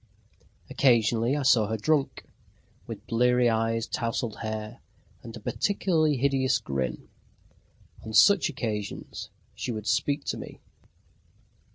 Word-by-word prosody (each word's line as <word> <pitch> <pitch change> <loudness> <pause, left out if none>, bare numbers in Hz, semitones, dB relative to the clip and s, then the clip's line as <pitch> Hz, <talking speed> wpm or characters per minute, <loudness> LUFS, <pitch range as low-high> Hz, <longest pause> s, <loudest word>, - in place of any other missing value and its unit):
Occasionally, 120 0 +2
I 145 - -2
saw 115 -5 +4
her 110 +1 -2
drunk, 145 +5 0 0.6
with 110 -3 -8
bleary 125 +1 +3
eyes, 115 0 0
tousled 115 -2 -3
hair, 110 0 -5 0.4
and 115 0 -9
a - - -9
particularly 160 - 0
hideous 135 0 +2
grin. 65 - -4 1.0
On 110 - -7
such 170 - +5
occasions 105 -6 -5 0.2
she - - -4
would 110 -2 -5
speak 140 +6 0
to - - -2
me. - - -9
115 Hz, 115 wpm, -27 LUFS, 110-135 Hz, 1.0 s, such